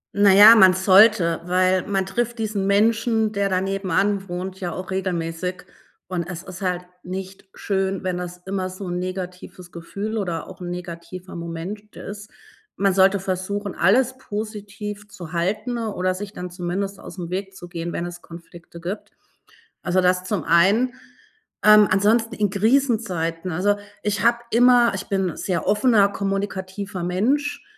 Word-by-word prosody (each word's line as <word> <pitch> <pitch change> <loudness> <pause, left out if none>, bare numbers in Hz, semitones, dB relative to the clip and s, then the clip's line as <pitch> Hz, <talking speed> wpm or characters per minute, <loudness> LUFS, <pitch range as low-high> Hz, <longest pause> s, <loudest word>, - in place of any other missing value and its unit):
Na 200 0 +6
ja, 205 +4 +10
man 190 -4 +7
sollte, 190 -3 +5
weil 185 +1 +2
man 195 -2 0
trifft 235 +5 -2
diesen 210 -3 -2
Menschen, 220 +2 +2
der 200 -1 0
dann 185 0 +1
nebenan 195 0 0
wohnt, 185 +2 -5
ja 180 -3 -3
auch 185 +2 -6
regelmäßig 180 -1 -3 0.4
und 175 -2 -3
es 175 -1 -6
ist 185 0 -10
halt 180 -2 -1 0.2
nicht 190 +2 -7
schön, 195 -1 -1
wenn 185 -1 -1
das 180 0 -6
immer 190 -1 -2
so 185 +2 -8
'n 175 0 -2
negatives 180 -1 -7
Gefühl 200 +6 -5
oder 175 -5 -3
auch - - -12
'n 175 - -5
negativer 175 +1 -8
Moment 170 +5 -7
ist. 205 +1 -8 0.5
Man 195 -1 +2
sollte 195 +1 +4
versuchen, 195 +2 -3
alles 250 +6 +3
positiv 210 -2 -6
zu 175 -4 -10
halten 205 +8 -1
oder 185 -5 -1
sich 195 +2 -6
dann 180 -3 -7
zumindest 190 +3 -3
ausm 175 -2 -8
Weg 195 +1 -4
zu 175 - -10
gehen, 170 -1 -5
wenn 170 - -3
es 175 0 -8
Konflikte 170 0 -12
gibt. 185 +5 -6 0.7
Also, 180 +1 +1
das 180 0 +2
zum 190 -4 -2
einen, 200 - +3 0.7
ähm, 210 0 +8
ansonsten 220 +4 +2
in 210 -1 +1
Krisenzeiten, 195 -7 0
also, 205 +5 +1 0.3
ich 205 0 -1
habe 235 0 +4
immer 240 0 +5
ich 195 0 -4
bin 195 -2 0
'n - - -12
sehr 175 -4 -2
offener, 210 0 +4
kommunikativer 195 -1 -4
Mensch, 255 +12 0
190 Hz, 160 wpm, -22 LUFS, 180-205 Hz, 0.7 s, ja